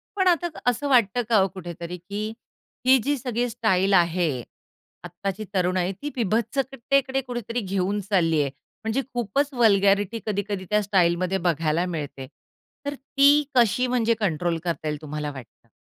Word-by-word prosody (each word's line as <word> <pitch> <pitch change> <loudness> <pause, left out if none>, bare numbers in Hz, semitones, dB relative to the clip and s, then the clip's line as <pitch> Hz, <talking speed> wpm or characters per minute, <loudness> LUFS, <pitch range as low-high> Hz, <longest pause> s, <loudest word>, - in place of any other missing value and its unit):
पण 380 -2 +2
आता 350 -1 +3 0.2
असं 245 +4 -2
वाटतं 245 -3 +3
का 225 - +5
हो 190 - +3
कुठेतरी, 175 -1 -7
की 205 +5 -5 0.5
हि 260 +1 +7
जी 285 +1 0
सगळी 245 -1 -2
स्टाईल 205 -5 +1
आहे, 170 -7 +2 0.6
आत्ताची 195 +4 -5
तरुण 185 -1 +1
आहे 180 +1 0
ती 295 - -3
विभत्सकतेकडे 265 +4 0
कुठेतरी 240 -2 -4
घेऊन 195 +1 -1
चालली 165 -6 +3
आहे. 140 -2 -1 0.3
म्हणजे 225 +5 0
खूपच 245 +4 0
वल्गॅरिटी 205 -2 +3
कधी-कधी 205 -2 -2
त्या 210 0 +3
स्टाईलमध्ये 185 -1 +2
बघायला 165 +1 +1
मिळते. 145 -6 -5 0.6
तर 285 - -2
ती 280 +2 +4
कशी 245 +1 +3
म्हणजे 235 -2 +2
कंट्रोल 175 -4 0
करता 170 -3 -3
येईल 150 0 -3
तुम्हाला 150 -1 -4
वाटतं? 125 -4 -13
200 Hz, 150 wpm, -24 LUFS, 175-245 Hz, 0.6 s, हि